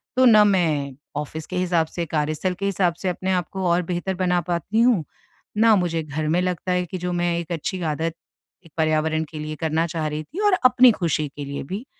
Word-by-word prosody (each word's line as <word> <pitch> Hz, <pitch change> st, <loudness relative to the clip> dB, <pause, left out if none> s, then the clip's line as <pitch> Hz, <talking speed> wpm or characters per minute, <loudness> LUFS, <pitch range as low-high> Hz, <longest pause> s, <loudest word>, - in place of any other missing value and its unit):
तो 255 Hz, 0 st, +5 dB
न 215 Hz, -3 st, +7 dB
मैं 155 Hz, -8 st, +1 dB, 0.2 s
ऑफिस 150 Hz, +1 st, -5 dB
के 185 Hz, -, -6 dB
हिसाब 175 Hz, -3 st, +1 dB
से 170 Hz, +1 st, -4 dB
कार्यस्थल 155 Hz, +4 st, -1 dB
के 200 Hz, -, -2 dB
हिसाब 190 Hz, -3 st, +1 dB
से 185 Hz, -, +1 dB
अपने 185 Hz, +1 st, -2 dB
आप 180 Hz, -4 st, 0 dB
को 190 Hz, -1 st, -3 dB
और 170 Hz, +1 st, +3 dB
बेहतर 180 Hz, +2 st, -3 dB
बना 180 Hz, -1 st, +1 dB
पाती 175 Hz, +6 st, -1 dB
हूँ, 235 Hz, -8 st, +4 dB, 0.5 s
ना 220 Hz, 0 st, +6 dB
मुझे 170 Hz, -4 st, 0 dB
घर 155 Hz, +1 st, -3 dB
में 170 Hz, +3 st, +2 dB
लगता 180 Hz, 0 st, -2 dB
है 180 Hz, 0 st, 0 dB
कि 185 Hz, -, -6 dB
जो 180 Hz, 0 st, -3 dB
मैं 175 Hz, -1 st, 0 dB
एक 170 Hz, 0 st, -7 dB
अच्छी 175 Hz, +3 st, -3 dB
आदत 160 Hz, +1 st, -2 dB, 0.5 s
एक 165 Hz, -, -17 dB
पर्यावरण 155 Hz, 0 st, +1 dB
के 155 Hz, -, -7 dB
लिए 155 Hz, 0 st, -5 dB
करना 160 Hz, +1 st, 0 dB
चाह 160 Hz, -2 st, -2 dB
रही 150 Hz, +1 st, -4 dB
थी 315 Hz, -, -9 dB
और 410 Hz, -, +4 dB
अपनी 255 Hz, 0 st, +7 dB
खुशी 165 Hz, -7 st, -1 dB
के 145 Hz, -, -5 dB
लिए 140 Hz, 0 st, -5 dB
भी, 195 Hz, -, -6 dB
175 Hz, 225 wpm, -23 LUFS, 155-185 Hz, 0.5 s, न